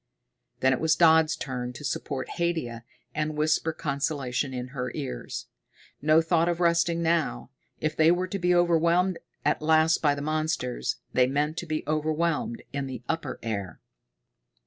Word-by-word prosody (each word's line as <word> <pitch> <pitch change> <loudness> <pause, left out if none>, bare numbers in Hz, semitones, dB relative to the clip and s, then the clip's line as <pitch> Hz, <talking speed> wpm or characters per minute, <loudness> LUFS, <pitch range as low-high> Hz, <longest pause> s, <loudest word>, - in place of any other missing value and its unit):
Then 130 0 +4
it 130 - -1
was 160 -1 +3
Dodd's 160 -2 +5
turn 125 -2 -4
to 135 +4 -8
support 130 0 -3
Haidia 155 -10 -2 0.3
and 155 0 -2
whisper 155 +1 +2
consolation 140 -3 -2
in 125 -1 -5
her 125 -1 -4
ears. - - -5 0.6
No 155 +2 +4
thought 165 0 +2
of 170 0 -1
resting 170 -1 +2
now. 165 - 0 0.3
If 155 0 -1
they 160 +1 +5
were 175 +2 +2
to 195 +2 -4
be 180 0 +3
overwhelmed 175 +1 +3 0.3
at - - +2
last 160 +1 +4
by 145 -2 +3
the 140 - -5
monsters, 155 -5 -1 0.2
they 125 -1 +4
meant 145 +3 0
to 175 - -4
be 155 0 -2
overwhelmed 165 +10 -1
in 140 -1 -2
the 125 -2 -7
upper 165 0 -2
air. 100 -7 -4
155 Hz, 160 wpm, -27 LUFS, 135-170 Hz, 0.6 s, Dodd's